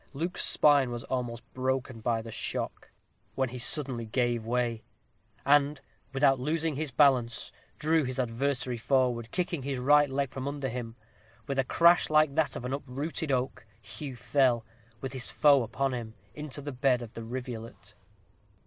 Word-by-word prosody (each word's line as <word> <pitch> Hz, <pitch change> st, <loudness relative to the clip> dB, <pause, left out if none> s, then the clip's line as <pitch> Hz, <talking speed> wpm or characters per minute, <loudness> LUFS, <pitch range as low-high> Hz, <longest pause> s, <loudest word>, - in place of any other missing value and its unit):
Luke's 165 Hz, +6 st, -1 dB
spine 145 Hz, -4 st, +5 dB
was 120 Hz, -1 st, -5 dB
almost 120 Hz, -2 st, -4 dB
broken 130 Hz, -1 st, -2 dB
by 115 Hz, 0 st, -1 dB
the 115 Hz, -, -8 dB
shock, -, -, -4 dB, 0.5 s
when 130 Hz, -1 st, 0 dB
he 125 Hz, +1 st, -7 dB
suddenly 125 Hz, -3 st, +2 dB
gave 120 Hz, 0 st, 0 dB
way; 120 Hz, -1 st, -1 dB, 0.6 s
and, 145 Hz, +1 st, +3 dB, 0.3 s
without 135 Hz, -1 st, +3 dB
losing 160 Hz, +3 st, -1 dB
his 155 Hz, +1 st, -2 dB
balance, 125 Hz, -3 st, +2 dB, 0.3 s
drew 160 Hz, +1 st, +2 dB
his 130 Hz, 0 st, -3 dB
adversary 125 Hz, +1 st, -1 dB
forward, 120 Hz, -2 st, +1 dB
kicking 175 Hz, -2 st, -2 dB
his 135 Hz, 0 st, -3 dB
right 145 Hz, +3 st, +4 dB
leg 135 Hz, -1 st, -1 dB
from 135 Hz, 0 st, -5 dB
under 140 Hz, -2 st, -3 dB
him. 115 Hz, -1 st, -6 dB, 0.5 s
With 135 Hz, -1 st, -2 dB
a -, -, +4 dB
crash 170 Hz, +6 st, +4 dB
like 155 Hz, -2 st, +4 dB
that 150 Hz, -3 st, +1 dB
of 125 Hz, -, -6 dB
an 125 Hz, -, -3 dB
uprooted 140 Hz, +3 st, -3 dB
oak, 125 Hz, -3 st, -2 dB
Hugh 125 Hz, +6 st, -8 dB
fell, 125 Hz, -1 st, +1 dB, 0.4 s
with 135 Hz, -1 st, -5 dB
his 130 Hz, -2 st, +1 dB
foe 145 Hz, -3 st, +5 dB
upon 130 Hz, +4 st, -2 dB
him, 115 Hz, -2 st, -6 dB, 0.2 s
into 150 Hz, -1 st, -5 dB
the 145 Hz, -, -4 dB
bed 125 Hz, -1 st, +1 dB
of 115 Hz, -, -11 dB
the 115 Hz, -, -7 dB
rivulet. 120 Hz, -1 st, -7 dB
130 Hz, 165 wpm, -29 LUFS, 120-145 Hz, 0.6 s, spine